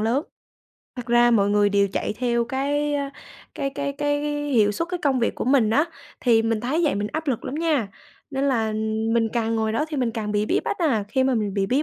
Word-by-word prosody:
lớn. 235 +7 +1 0.7
Thật 245 -1 -6
ra 240 0 +4
mọi 205 -3 +3
người 205 0 +4
đều 200 0 +2
chạy - - -1
theo 235 -1 +1
cái 290 +3 -1 0.6
cái 275 - -2
cái 280 0 -3
cái 290 0 -1 0.3
hiệu 215 -5 +3
suất, 335 +9 -3
cái 360 0 -3
công 270 -3 +2
việc 230 - 0
của - - -4
mình 250 -4 +3
á, 295 +8 +3 0.4
thì 230 -3 +4
mình 225 -1 0
thấy 280 +8 0
vậy 290 - +2
mình 205 +1 -2
áp 315 +1 -3
lực 245 - -1
lắm 275 - -4
nha, 305 -9 0 0.4
nên 270 0 -1
là 225 -5 +1 0.4
mình 230 -1 +2
càng 230 -1 0
ngồi 220 0 0
đó 300 +7 0
thì 305 - -4
mình 245 -3 0
càng 215 -2 -4
bị 210 +1 +1
bí - - +1
bách - - -2
à. 255 - +1
Khi 260 +5 +1
mà 265 -1 +2
mình 210 -3 -1
bị 195 -1 +1
bí 265 +7 +1
240 Hz, 240 wpm, -23 LUFS, 220-280 Hz, 0.7 s, ra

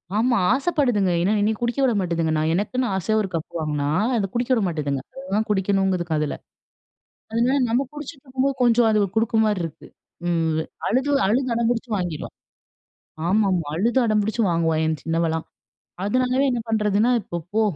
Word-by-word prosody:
ஆமா, 235 +3 +2 0.2
ஆசைப்படுதுங்க. 260 - +1
ஏன்னா, 190 +5 +2
என்னைய 215 +2 +1
குடிக்க 240 +3 -1
விட 255 -3 +3
மாட்டுதுங்க. 170 -3 0
நான் 155 +1 +1
எனக்குன்னு 245 +8 0
ஆசையா 190 +3 0
ஒரு 195 - -3
கப் 165 +1 -4
வாங்குனா, 150 -2 -1 0.3
அத 200 -3 0
குடிக்க 240 +2 -1
விட 235 - +2
மாட்டேதுங்க. 145 -5 -2 0.2
அதுதான் 220 -5 -2
குடிக்கணும்ங்கிதுக 190 -3 +1
அதுல. 150 -1 -1 1.0
அதனால 240 +5 +2
நம்ம 245 +4 +1
குடிச்சுட்டுருக்கும்போது 275 -2 -3
கொஞ்சம் 240 -1 +4
அது 215 - +3 0.2
குடுக்கிறமாரி 220 -3 +2
இருக்கு. 165 - -8 0.4
ம். 165 -2 +1 0.3
அழுது, 265 +5 +1 0.2
அழுது, 255 +6 +1
அடம் 230 0 +1
பிடிச்சு 240 0 -2
வாங்கிருவா! 175 -5 -4 1.0
ஆமாங்க, 190 -3 +2
அழுது 230 +9 +1
அடம்பிடிச்சு 215 +1 +1
வாங்குவா! 165 -1 +1
என் 160 -1 -1
சின்னவள்லாம். 165 0 -1 0.6
அதனாலவே 255 +5 +1
என்ன 245 - -1
பண்ணுறதுன்னா, 215 +1 +2
"இப்போ 175 - -5 0.2
போ! 220 - +3
210 Hz, 150 wpm, -23 LUFS, 170-245 Hz, 1.0 s, கொஞ்சம்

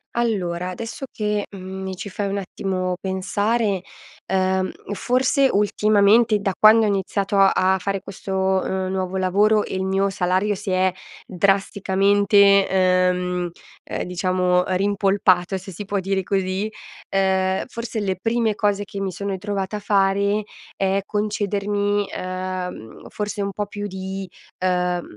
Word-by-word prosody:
Allora 185 -7 -1
adesso 230 +7 -6
che, 210 -1 -1
mhmm, 190 -1 -8
mi 190 0 -4
ci 185 - -7
fai 200 +1 -3
un 200 - -2
attimo 185 -1 -2
pensare, 200 +2 0 0.5
uhm, 190 0 +1 0.2
forse 255 +4 +2
ultimamente, 210 +2 +4
da 195 -1 -1
quando 220 +1 +7
ho - - +2
iniziato 200 +1 -1
a 190 -1 +4
fare 195 +1 -2
questo, 195 0 -6 0.3
uhm, 190 0 -2
nuovo 190 0 -2
lavoro 205 +3 +3
e - - -7
il 190 - -1
mio 195 +1 +1
salario 185 +2 +1
si 205 +1 -6
è 185 0 +2 0.3
drasticamente, 200 +1 +3
uhm, 180 -1 +1 0.4
uhm, - - -2
diciamo 180 0 +1
rimpolpato, 195 -1 +2
se 190 +1 -9
si 205 - -7
può 200 0 -1
dire 190 0 -1
così. 190 +2 -1 0.4
Uhm, 190 -1 +1
forse 230 -2 -5
le 190 -2 -1
prime 225 -1 +1
cose 205 -1 0
che 195 0 -6
mi 195 -1 -2
sono 200 +3 -4
ritrovata 195 +1 -3
a - - -5
fare 200 +1 +2 0.3
è 195 0 +1
concedermi, 205 -1 -1
uhm, 185 -9 -5
forse 210 0 -4
un 200 0 -2
po' 205 +1 -3
più 205 0 -6
di 190 0 -6 0.3
uhm, 180 -1 +1
195 Hz, 140 wpm, -22 LUFS, 185-205 Hz, 0.5 s, quando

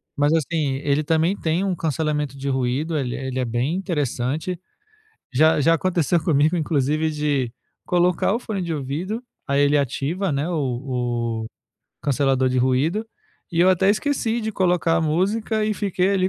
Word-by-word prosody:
Mas, 145 +1 +2
assim, 155 -3 0
ele 145 +1 +2
também 160 +3 +2
tem 165 +3 0
um 195 -2 0
cancelamento 150 -3 -1
de 140 +1 -3
ruído, 135 +5 0
ele 125 -4 -2
ele 130 -1 -4
é 125 - 0
bem 120 +7 -1
interessante. 155 - -2 0.7
Já 155 +3 +4
já 165 +3 +4
aconteceu 170 -1 +1
comigo, 155 +1 +3
inclusive, 155 0 +1
de 145 -5 -1 0.3
colocar 180 +1 +2
o - - 0
fone 215 -6 -4
de 170 -1 -3
ouvido, 160 - -3 0.3
aí 140 +1 +2
ele 145 +1 +4
ativa 145 +7 -1
não 140 0 0
é 160 - -2
o - - -2
o 125 -5 -2
o - - -15 0.4
cancelador 135 -2 +2
de 130 0 0
ruído, 135 - +1 0.5
e 170 - -3
eu 180 - +6
até 190 +1 +4
esqueci 235 0 0
de 220 -1 -3
colocar 175 -3 +2
a - - +2
música 205 +7 0
e 215 0 0
fiquei 195 -2 0
ali 185 -1 +2
155 Hz, 175 wpm, -22 LUFS, 135-180 Hz, 0.7 s, eu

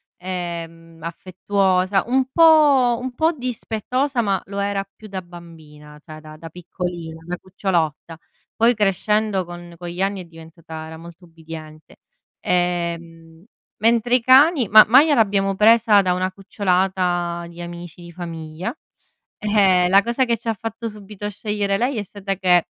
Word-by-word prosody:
ehm, 170 -2 -7
affettuosa, 185 +2 0
un 260 +1 +2
po' 295 -7 +5
un 255 0 -5
po' 320 +6 +2
dispettosa, 250 0 -2
ma 195 -3 0
lo 200 +1 -8
era 200 0 -1
più 220 - -13
da 190 -2 -5
bambina, 160 -4 -14
cioè 155 -2 -11
da 155 0 -12
da 165 +1 -10
piccolina, 175 -2 -7
da 180 0 -4
cucciolotta. 170 -4 -3 0.4
Poi 230 +2 +4
crescendo 210 -1 0
con 175 0 -11
con 175 +1 -8
gli 175 +2 -5
anni 195 0 -1
è - - -11
diventata 165 -1 -11
era 160 0 -9
molto 170 +2 -13
ubbidiente. 160 -2 -12 0.4
Ehm, 170 -2 -3 0.4
mentre 235 +2 +3
i 250 - +2
cani 265 - +5
ma 215 +2 +9
Maya 285 +7 +6
l'abbiamo 200 -4 +2
presa 215 0 +5
da 180 -2 +1
una 185 +1 -1
cucciolata 180 -3 -1
di 170 0 -11
amici 175 0 -9
di 170 0 -11
famiglia, 165 - -6 0.6
e 195 -4 +3
la 195 +2 +6
cosa 235 +4 0
che 235 -1 0
ci 230 - -12
ha 225 - +1
fatto 225 +2 -6
subito 210 -1 -8
scegliere 205 -1 -2
lei 245 +3 -1
è - - -3
stata 195 0 -5
che 180 -2 +3
185 Hz, 155 wpm, -21 LUFS, 170-215 Hz, 0.6 s, ma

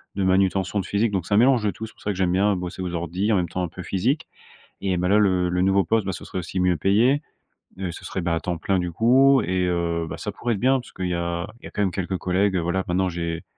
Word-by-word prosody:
de 100 - -1
manutention 95 +1 +2
de 95 - -3
physique 105 +3 +1
donc 95 -4 -1
ça 100 +3 +1
mélange 125 -1 +4
de 105 - +1
tout, 110 - -7
c'est 110 - -12
pour - - -23
ça 105 - -1
que - - -4
j'aime 90 -2 +1
bien 100 +2 +2
bosser 90 +1 -5
aux 90 -1 -4
ordis 90 +6 -1
en - - +4
même 90 -3 0
temps 90 - -2
un 90 - -1
peu 90 +3 -9
physique. 115 - -1 0.5
Et 95 -2 0
bah, 90 +1 0
là, 100 +3 +4
le 95 -4 +3
le 90 +1 0
nouveau 95 +1 +3
poste, 110 -3 +1
bah, 95 - -1
ce - - -8
serait 95 - -4
aussi 90 +2 -4
mieux 90 -1 +3
payé. 115 - +3 0.6
Heu, 90 -3 -3
ce - - -10
serait, 95 - -4
bah, 85 -1 0
à 80 - -1
temps 85 -2 -3
plein 95 +1 0
du 90 -1 -3
coup 130 +8 +5
et 90 +1 0
heu, 85 -1 -1
bah, - - -5
ça - - -4
pourrait 120 -1 -2
être 100 - -5
bien 130 +1 +3
parce - - -14
qu'il 95 -1 -4
y 90 - -1
a 85 +1 -2
il - - -21
y - - -6
a - - -13
quand 105 - -2
même 95 -3 +1
quelques 95 0 -2
collègues, 95 +1 +1
heu, - - +1
voilà 85 +3 0
maintenant 90 +1 +1
j'ai 85 -1 -4
95 Hz, 300 wpm, -23 LUFS, 90-100 Hz, 0.6 s, coup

